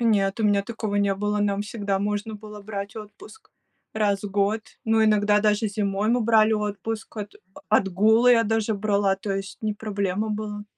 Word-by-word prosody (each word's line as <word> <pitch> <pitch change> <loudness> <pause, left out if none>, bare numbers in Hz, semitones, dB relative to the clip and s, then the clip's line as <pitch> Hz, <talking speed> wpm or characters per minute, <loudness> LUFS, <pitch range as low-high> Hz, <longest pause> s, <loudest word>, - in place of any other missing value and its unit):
Нет, 205 -4 +2
у - - +1
меня 205 -1 +3
такого 215 -1 -4
не 200 -1 +2
было, 210 +1 -1
нам 205 0 0
всегда 205 -2 -2
можно 210 +2 -2
было 210 0 -10
брать 200 +1 -6
отпуск 220 - -12 0.4
раз 205 -2 +1
в 205 - -5
год, 205 +2 +1 0.2
но 225 0 +3
иногда 210 -1 +3
даже 210 +1 +2
зимой 205 0 -1
мы 245 +2 +2
брали 220 -1 +4
отпуск, 215 +1 -3
от 210 0 -6 0.3
отгулы 215 +4 +4
я 230 -1 +4
даже 220 0 0
брала, 200 -1 +1
то 200 0 -4
есть 195 0 -5
не 215 -1 -1
проблема 205 -1 -2
была. 210 -1 -4
210 Hz, 180 wpm, -24 LUFS, 200-220 Hz, 0.4 s, брали